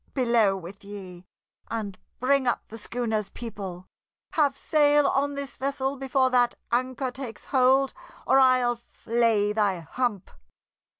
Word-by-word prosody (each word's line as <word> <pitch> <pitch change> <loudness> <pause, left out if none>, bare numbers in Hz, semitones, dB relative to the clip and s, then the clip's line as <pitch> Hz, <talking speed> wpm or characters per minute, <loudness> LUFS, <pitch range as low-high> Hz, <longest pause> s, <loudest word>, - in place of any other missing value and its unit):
Below 235 -6 +3
with 190 +3 -10
ye, 185 -3 -10 0.4
and 205 -4 -4 0.2
bring 265 +1 +2
up 240 - -1
the 225 - -9
schooner's 220 -2 -2
people. 195 -6 -7 0.5
Have 285 -3 +2
sail 295 -1 +3
on 280 +1 +1
this 280 -1 -6
vessel 275 0 -1
before 265 -1 +1
that 245 -1 +3 0.2
anchor 255 +2 0
takes 250 -4 -8
hold, 265 +1 +3 0.3
or 270 - +5
I'll 255 -2 +4
flay 230 -3 0
thy 200 -5 +1
hump!" 205 +3 -2
245 Hz, 130 wpm, -26 LUFS, 210-265 Hz, 0.5 s, or